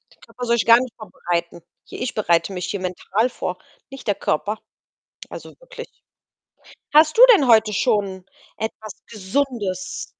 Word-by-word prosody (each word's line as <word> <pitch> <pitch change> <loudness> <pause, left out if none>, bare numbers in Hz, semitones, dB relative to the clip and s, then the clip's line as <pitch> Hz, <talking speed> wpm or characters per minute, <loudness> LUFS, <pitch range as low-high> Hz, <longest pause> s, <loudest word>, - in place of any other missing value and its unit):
Der - - -42
Körper 245 - -8
soll 235 0 +2
sich - - 0
gar 230 +1 +7
nicht 255 -2 -5
vorbereiten. 175 -5 -4 0.3
Hier - - -10
ich 250 - -3
bereite 175 -2 +1
mich 180 -1 -4
hier 200 - -3
mental 190 +6 -1
vor, 180 -6 -5 0.3
nicht 270 -4 -11
der 205 - +1
Körper. 210 +7 -2 0.7
Also, - - -9
wirklich. - - -10 1.1
Hast 310 +3 +5
du - - +8
denn 280 -9 +2
heute 220 -2 +4
schon 200 -4 -1 0.3
etwas 220 -1 -6
Gesundes 210 -3 -3
215 Hz, 155 wpm, -21 LUFS, 185-245 Hz, 1.1 s, du